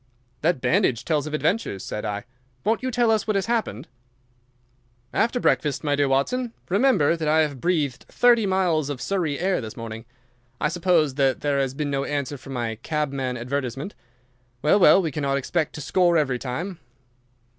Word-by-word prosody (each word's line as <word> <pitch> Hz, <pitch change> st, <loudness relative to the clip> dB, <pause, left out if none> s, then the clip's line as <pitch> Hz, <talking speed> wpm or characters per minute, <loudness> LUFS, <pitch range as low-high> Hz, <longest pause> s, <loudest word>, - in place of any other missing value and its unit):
"That 160 Hz, -5 st, +1 dB
bandage 125 Hz, -1 st, +1 dB
tells 150 Hz, -2 st, 0 dB
of 155 Hz, -, -2 dB
adventures," 155 Hz, -, -1 dB
said 105 Hz, -, -4 dB
I. 105 Hz, -1 st, -3 dB, 0.4 s
"Won't 220 Hz, +3 st, +1 dB
you 255 Hz, -, -2 dB
tell 240 Hz, -2 st, +2 dB
us 220 Hz, 0 st, +1 dB
what 215 Hz, -, +1 dB
has 195 Hz, -, +1 dB
happened?" 215 Hz, -, -2 dB, 1.3 s
"After 235 Hz, +2 st, +1 dB
breakfast, 145 Hz, -, +1 dB
my 145 Hz, -1 st, +1 dB
dear 145 Hz, 0 st, +2 dB
Watson. 230 Hz, -, 0 dB, 0.2 s
Remember 195 Hz, -, +3 dB
that 160 Hz, -2 st, -3 dB
I 155 Hz, +1 st, +4 dB
have 145 Hz, -5 st, -2 dB
breathed 155 Hz, -8 st, -1 dB
thirty 235 Hz, -4 st, +4 dB
miles 175 Hz, -6 st, +1 dB
of 140 Hz, -3 st, -4 dB
Surrey 160 Hz, 0 st, -1 dB
air 185 Hz, +1 st, 0 dB
this 110 Hz, -1 st, -8 dB
morning. 115 Hz, 0 st, -7 dB, 0.5 s
I -, -, +1 dB
suppose 165 Hz, -4 st, +2 dB
that 135 Hz, -1 st, +1 dB
there 145 Hz, -1 st, +1 dB
has 135 Hz, -1 st, -1 dB
been 145 Hz, 0 st, -2 dB
no 135 Hz, 0 st, 0 dB
answer 145 Hz, -1 st, -3 dB
from 135 Hz, +2 st, -9 dB
my 115 Hz, -3 st, -3 dB
cabman 140 Hz, -5 st, -2 dB
advertisement? 135 Hz, -, -3 dB, 0.7 s
Well, 155 Hz, +7 st, +4 dB
well, 185 Hz, +1 st, +6 dB
we 160 Hz, -, -1 dB
cannot 140 Hz, -1 st, -1 dB
expect 155 Hz, +4 st, -1 dB
to 150 Hz, -, -6 dB
score 175 Hz, +3 st, +3 dB
every 135 Hz, -5 st, +1 dB
time." 165 Hz, +9 st, -4 dB
150 Hz, 175 wpm, -24 LUFS, 135-180 Hz, 1.3 s, well